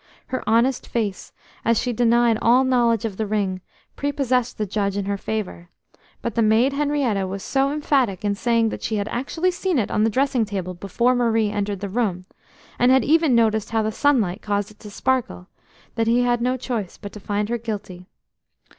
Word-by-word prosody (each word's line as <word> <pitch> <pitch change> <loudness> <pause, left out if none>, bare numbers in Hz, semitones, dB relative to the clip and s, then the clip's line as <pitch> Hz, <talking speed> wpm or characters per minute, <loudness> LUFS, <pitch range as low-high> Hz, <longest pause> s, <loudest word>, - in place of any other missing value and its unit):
Her 255 - -3
honest 235 +3 +2
face, 210 -5 -3 0.3
as 230 0 +2
she 245 0 -1
denied 235 -1 +3
all 245 +3 +5
knowledge 240 -4 +2
of 205 -4 -4
the 220 - -2
ring, 195 -3 -1 0.3
prepossessed 260 -4 -1
the 215 - -1
judge 200 0 -1
in 200 - -2
her 200 0 -1
favour, 195 -4 -5 0.5
but 235 - -2
the 230 - +1
maid 225 +5 +3
Henrietta 280 -9 0
was 195 +1 -5
so 275 0 +1
emphatic 270 - 0
in 205 - +2
saying 230 +1 +1
that - - -6
she 220 - -2
had 205 0 -1
actually 320 +8 -1
seen 355 -1 -1
it 220 - 0
on 210 - +2
the 225 - +3
dressing 260 0 +1
table 190 -4 -4
before 200 +7 0
Marie 225 -3 +1
entered 205 -1 -3
the 200 - -3
room, 195 -4 -1 0.5
and 245 +1 +5
had 265 0 +5
even 315 -4 +3
noticed 220 -2 +2
how 225 -1 0
the 215 - -1
sunlight 225 -8 +1
caused 205 0 -2
it 215 - -20
to 210 - -10
sparkle, 215 - -1 0.5
that 225 -1 -1
he 235 +2 +3
had 240 -1 +1
no 255 +2 +1
choice 230 -7 -4
but 200 -2 -9
to 210 - -9
find 205 +1 -2
her 240 0 -1
guilty. 195 -5 -6
225 Hz, 200 wpm, -22 LUFS, 205-250 Hz, 0.5 s, all